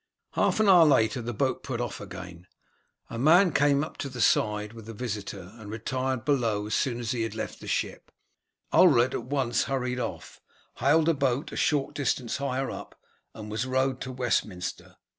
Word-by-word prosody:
Half - - +1
an 215 - +4
hour 180 -3 +8
later 125 -4 +3
the 120 +1 -4
boat 130 +3 -1
put 130 -4 -4
off 120 -2 -4
again; 90 -2 -9 0.6
a 115 - -6
man 170 +6 +5
came 145 0 +3
to 140 - -3
the 125 -1 -8
side 105 -1 +2
with 115 -2 -11
the 115 - -8
visitor 100 -5 -5
and 105 -2 -10
retired 130 +3 -2
below 115 -8 +1
as 105 - -4
soon 120 -3 0
as 120 0 -2
he 115 -3 -1
left 110 - -6
the - - -10
ship. - - -3 0.6
Ulred 130 -8 +5
at - - -3
once 130 -3 0
hurried 125 -2 -2
off, - - -6 0.4
hailed 155 +3 +3
a 165 - +5
boat 140 +1 -1
a - - -7
short 145 -5 +1
distance 130 -4 -1
higher 135 -1 -2
up - - -9 0.4
and 105 -1 -8
was 110 +4 -2
rowed 130 0 0
to 130 - -4
Westminster. 105 -8 -2
125 Hz, 180 wpm, -27 LUFS, 110-140 Hz, 0.6 s, hour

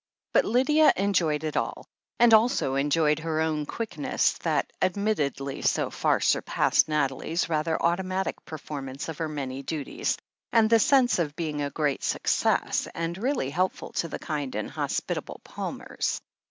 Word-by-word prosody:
But - - +4
Lydia 300 +7 +4
enjoyed 175 -6 +1
it 155 -1 -3
all, - - -2 0.3
and 235 -1 +6
also 220 - +4
enjoyed 150 +2 +2
her 160 -1 -2
own 155 -2 0
quickness, 175 -10 0
that - - -1
admittedly 175 -9 -1
so - - +1
far - - +1
surpassed - - +2
Nathalie's 150 +3 0
rather 160 0 0
automatic 185 +2 -1
performance 140 -2 -6
of 160 - -6
her 160 -1 -1
many 135 -3 -4
duties, 160 - -2 0.3
and 225 -1 +4
the 230 - +7
sense 250 -3 +4
of 150 -3 -1
being 155 -3 -3
a 145 - -1
great 145 -2 -1
success, - - +1
and 165 +1 -2
really 225 - -1
helpful 185 +5 -1
to 165 - -1
the - - -5
kind 145 -6 -4
and 105 - -3
hospitable - - -3
Palmers. - - -4
160 Hz, 150 wpm, -27 LUFS, 145-195 Hz, 0.3 s, the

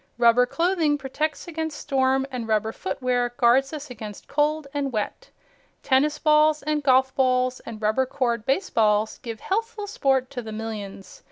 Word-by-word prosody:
Rubber 240 +1 +5
clothing 330 -2 +1
protects 290 +5 -3
against 320 -2 -4
storm 265 -1 +1
and 245 -3 -4
rubber 220 0 +1
footwear 245 +4 -2
guards 260 +3 +4
us 300 -3 -7
against 215 -3 -9
cold 305 +1 0
and 280 -2 -2
wet. 215 -3 -4 0.5
Tennis 290 +3 +2
balls 305 0 +3
and 300 0 0
golf 265 -1 +3
balls 255 -1 +1
and 225 -2 -7
rubber 220 +5 +1
cored 240 -4 -1
baseballs 220 - +1
give 230 -3 -7
healthful 445 +1 -2
sport 270 -8 0
to 255 -3 -4
the 220 -2 -8
millions. 210 -3 -7
260 Hz, 155 wpm, -24 LUFS, 230-300 Hz, 0.5 s, Rubber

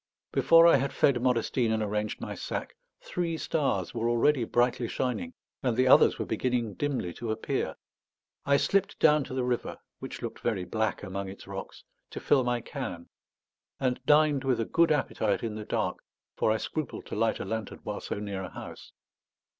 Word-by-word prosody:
Before 165 0 +6
I 170 - +7
had 135 +1 -2
fed 130 -4 +3
Modestine 120 -1 +1
and 110 -1 +1
arranged 105 0 -2
my - - -5
sack, - - -5 0.3
three 170 -2 -2
stars 135 - -1
were 115 +1 0
already 120 +2 +3
brightly 120 +1 +1
shining, 240 - -2 0.3
and 125 -4 0
the 130 0 +4
others - - +6
were - - -2
beginning 120 -4 -1
dimly 130 -9 -2
to 115 +4 -6
appear. 110 0 -2 0.7
I 140 0 +4
slipped 195 +5 +1
down 150 -2 +5
to 130 - -7
the 130 - 0
river, 125 -1 -2 0.2
which - - -7
looked - - -5
very 90 - -1
black 110 +3 -1
among 95 0 -4
its 95 - -10
rocks, 95 0 -8 0.3
to - - -6
fill 135 -3 +3
my 120 -1 0
can; 115 - -6 0.7
and 125 -2 -1
dined 150 -2 +4
with 130 -3 +1
a 115 - 0
good 170 +5 +3
appetite 145 -4 0
in 115 -2 -2
the 105 0 -6
dark, - - -1 0.4
for - - +2
I 110 - +2
scrupled 155 +4 -4
to - - -6
light 110 +1 +1
a - - -4
lantern 110 -2 -4
while - - -4
so - - -4
near 100 -2 -4
a 95 - -6
house. - - -10
120 Hz, 185 wpm, -29 LUFS, 110-140 Hz, 0.7 s, I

